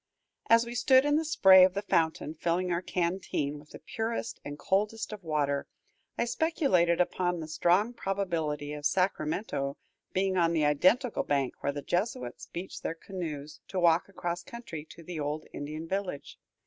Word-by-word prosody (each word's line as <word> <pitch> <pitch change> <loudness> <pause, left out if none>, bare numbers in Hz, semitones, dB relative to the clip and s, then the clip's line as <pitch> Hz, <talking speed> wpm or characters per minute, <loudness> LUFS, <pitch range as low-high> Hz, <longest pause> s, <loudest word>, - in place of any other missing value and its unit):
As 230 +1 +6
we 235 - -6
stood 260 +3 +5
in 290 0 +3
the 320 - +1
spray 190 -12 +7
of 185 0 +4
the 200 - -2
fountain, 160 -5 +1
filling 175 +3 -1
our 170 0 0
canteen 170 -5 -2
with 150 +1 -17
the - - -10
purest 225 +1 -4
and 145 0 -6
coldest 210 +6 -1
of 205 -3 -9
water, 145 -3 0 0.5
I - - +1
speculated 240 - +2
upon 180 0 +1
the 160 - -5
strong 175 +8 +2
probability 165 -9 -2
of 150 -1 0
Sacramento 155 -5 -1 0.3
being 190 0 +1
on 170 -1 +3
the 155 -2 +2
identical 185 - +3
bank 140 -3 -1
where 140 - 0
the 145 0 -6
Jesuits 175 - -2
beached 180 +3 -7
their 165 - -3
canoes 160 -5 -6
to 190 - -3
walk 170 +1 +3
across 175 -2 -3
country 175 -6 -8
to 170 - -12
the 170 -1 -6
old 150 +1 -3
Indian 155 +3 -5
village. 190 -5 -4
175 Hz, 170 wpm, -29 LUFS, 155-200 Hz, 0.5 s, spray